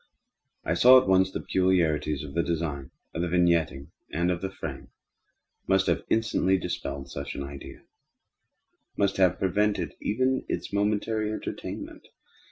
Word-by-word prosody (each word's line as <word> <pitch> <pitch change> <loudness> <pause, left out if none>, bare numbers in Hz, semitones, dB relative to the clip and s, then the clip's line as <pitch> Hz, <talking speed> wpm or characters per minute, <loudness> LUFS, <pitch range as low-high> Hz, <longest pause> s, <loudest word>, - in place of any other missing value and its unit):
I - - +1
saw 125 +9 +8
at 130 - -4
once 95 0 +4
that - - -4
the - - -19
peculiarities 80 -6 +1
of 70 -2 -8
the 85 - +2
design, 80 -5 -3 0.2
of 80 - -2
the 90 - 0
vignetting, 85 -5 +1 0.2
and 85 +3 +1
of 85 -1 -2
the 95 - -2
frame, 75 -7 -7 0.8
must - - +3
have - - 0
instantly 110 -4 +2
dispelled 70 -6 -5
such 70 - -5
idea—must 70 +7 -7
have 90 -3 +3
prevented 105 +2 0
even 130 +4 0
its - - -4
momentary 105 +1 0
entertainment. 110 - -6
90 Hz, 140 wpm, -27 LUFS, 80-100 Hz, 0.8 s, saw